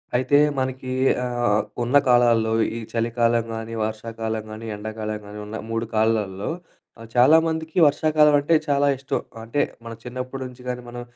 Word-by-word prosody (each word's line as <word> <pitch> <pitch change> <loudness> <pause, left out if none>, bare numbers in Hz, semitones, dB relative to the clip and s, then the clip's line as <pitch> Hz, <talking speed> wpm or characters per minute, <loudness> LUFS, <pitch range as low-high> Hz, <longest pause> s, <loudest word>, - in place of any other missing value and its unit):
అయితే 130 +3 +3 0.2
మనకీ 130 0 -3 0.3
ఆహ్, 120 -4 +1 0.2
ఉన్న 125 +4 +4
కాలాల్లో 120 -2 +4 0.2
ఈ - - -3
చలికాలం 115 0 +1
గానీ, 115 0 -6
వర్షాకాలం 110 0 -4
గానీ, 110 +1 -8
ఎండాకాలం 110 0 -5
గానీ 105 +1 -9
ఉన్న 105 +1 -7
3 115 0 -1
కాలాల్లో 110 -3 0 0.5
ఆహ్, 115 - -10
చాలామందికి 160 +5 +3
వర్షాకాలం 150 0 +4
అంటే 145 +4 +1
చాలా 145 0 +2
ఇష్టం. 135 +1 -2 0.2
అంటే 115 +6 -1 0.2
మన 115 - -6
చిన్నప్పుడి 130 +2 -6
నుంచి 125 0 -14
గానీ 125 0 -3
మనం 120 0 -7
120 Hz, 145 wpm, -23 LUFS, 110-130 Hz, 0.5 s, ఉన్న